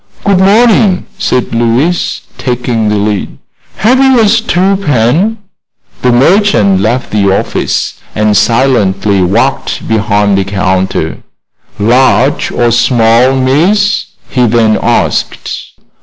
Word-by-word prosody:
"Good 200 -3 +2
morning," 205 -1 +3
said 125 -2 -1
Louise, 120 +9 0 0.2
taking 120 -3 -2
the 105 - 0
lead. 105 0 -2 0.4
"Have 235 +7 +1
you 265 -2 +3
a 220 - +3
stew 200 -3 +1
pan?" 160 - 0 0.6
The 125 - +2
merchant 130 - +2
left 120 +5 -2
the 100 -2 +1
office 95 - -2 0.2
and 105 0 +1
silently 105 -5 +1
walked 115 +9 -1
behind 105 -2 0
the - - 0
counter. 95 -1 -2 0.6
"Large 130 +5 +1
or 120 -1 0
small, 120 +1 +2
miss?" 175 +11 +1 0.2
he 125 -2 0
then 110 -1 +1
asked. - - -2
125 Hz, 110 wpm, -9 LUFS, -, 0.6 s, morning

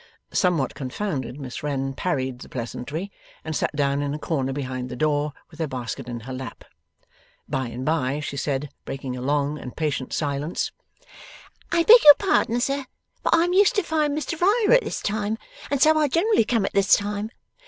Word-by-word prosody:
Somewhat 170 - +2
confounded, 135 - -4
Miss 130 -3 -6
Wren 135 -2 -2
parried 130 -5 -2
the - - -11
pleasantry, 140 +9 -5 0.3
and 160 -1 -3
sat - - -1
down 140 0 +1
in 145 0 -2
a - - -3
corner 140 -4 -1
behind 130 -2 -4
the 125 - -5
door, 150 +2 +1 0.2
with 160 - -15
her 160 - 0
basket 125 -1 -5
in 120 -1 -5
her 130 +4 -7
lap. 130 -3 -7 0.8
By 130 -1 -2
and 125 +2 -6
by, 145 -3 0
she 150 -2 -5
said, 140 0 -2
breaking 135 -2 -5
a 125 - -6
long 145 +2 0
and 125 - -9
patient 145 -4 -2
silence: 145 +2 -2 1.0
'I 340 -1 +3
beg 470 +6 +8
your 295 -1 +11
pardon, 375 - +1
sir, 275 +2 -1 0.4
but - - +3
I 330 - +4
am 355 +1 0
used 405 +6 +5
to 405 - +2
find 305 -3 0
Mr 315 +2 -4
Riah 420 +5 +5
at - - -2
this - - -4
time, 210 +1 -1 0.3
and 280 - 0
so 315 +3 +6
I 305 -1 +3
generally 335 - +3
come 225 -3 +1
at - - -3
this 200 0 +5
time. 205 +1 -3
150 Hz, 195 wpm, -24 LUFS, -, 1.0 s, your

